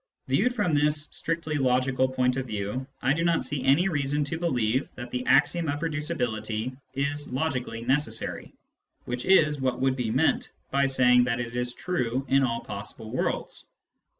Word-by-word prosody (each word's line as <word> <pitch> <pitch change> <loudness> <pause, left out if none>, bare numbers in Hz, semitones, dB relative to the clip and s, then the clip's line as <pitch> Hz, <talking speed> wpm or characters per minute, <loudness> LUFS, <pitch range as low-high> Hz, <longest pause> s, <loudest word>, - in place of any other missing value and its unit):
Classes - - +2
101 - - +4
Viewed 250 - -8 0.3
from - - +4
this 150 0 -2
strictly 165 -2 -2
logical 130 0 +2
point 125 -1 +1
of 130 -1 -3
view, 105 +4 -3 0.2
I 135 - +4
do 165 +2 -1
not 170 -1 +2
see 145 -3 -3
any 145 +8 +4
reason 145 -3 0
to 150 +3 -3
believe 130 -6 0
that 120 -1 -8
the 125 0 -2
axiom 165 +3 +3
of 145 +1 -2
reducibility 130 -8 -2 0.2
is 140 +1 -2
logically 125 -4 -2
necessary, 135 +5 -1 0.5
which 125 0 -4
is 155 -6 +4
what 130 -1 0
would 130 0 +2
be 125 -4 -2
meant 135 +8 +1 0.2
by 140 0 +3
saying 125 -2 +5
that 120 -1 -1
it 120 0 -4
is 125 0 -2
true 130 -7 -2
in 135 +1 +4
all 115 -3 0
possible 105 +2 -7
worlds. 130 - -3
130 Hz, 180 wpm, -27 LUFS, 125-150 Hz, 0.5 s, saying